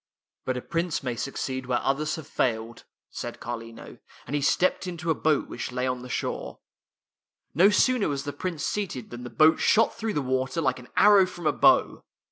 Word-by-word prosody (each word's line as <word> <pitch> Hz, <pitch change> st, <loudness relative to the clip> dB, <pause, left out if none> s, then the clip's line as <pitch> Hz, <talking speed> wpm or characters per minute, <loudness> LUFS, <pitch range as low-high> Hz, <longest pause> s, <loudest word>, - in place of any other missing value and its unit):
" -, -, -61 dB
But 130 Hz, -1 st, -1 dB
a 125 Hz, -, -5 dB
Prince 170 Hz, -2 st, -2 dB
may 125 Hz, -2 st, -2 dB
succeed 130 Hz, +1 st, -4 dB
where 125 Hz, -1 st, +1 dB
others 145 Hz, +3 st, 0 dB
have 160 Hz, -4 st, -8 dB
failed," 115 Hz, -5 st, -2 dB, 0.3 s
said -, -, -6 dB
Carlino, 115 Hz, -1 st, -8 dB, 0.3 s
and 145 Hz, -, -4 dB
he 145 Hz, -, 0 dB
stepped 180 Hz, +6 st, +1 dB
into 170 Hz, -2 st, -2 dB
a -, -, +4 dB
boat 155 Hz, -1 st, +1 dB
which 120 Hz, -, -5 dB
lay 125 Hz, +1 st, -2 dB
on 125 Hz, -1 st, -2 dB
the 125 Hz, -, -9 dB
shore. -, -, -4 dB, 1.0 s
No 180 Hz, +6 st, +6 dB
sooner 235 Hz, +1 st, +2 dB
was 140 Hz, -1 st, -2 dB
the 145 Hz, -, -5 dB
Prince 165 Hz, +1 st, -4 dB
seated 180 Hz, -, -3 dB
than 120 Hz, 0 st, -8 dB
the 125 Hz, -, -6 dB
boat 155 Hz, +4 st, +4 dB
shot 225 Hz, +1 st, +3 dB
through 225 Hz, -1 st, -3 dB
the 145 Hz, -, 0 dB
water 130 Hz, +4 st, -1 dB
like 130 Hz, -5 st, 0 dB
an 125 Hz, -, -14 dB
arrow 200 Hz, -2 st, +6 dB
from 175 Hz, -2 st, -9 dB
a -, -, +3 dB
bow. -, -, +3 dB
140 Hz, 205 wpm, -26 LUFS, 125-170 Hz, 1.0 s, No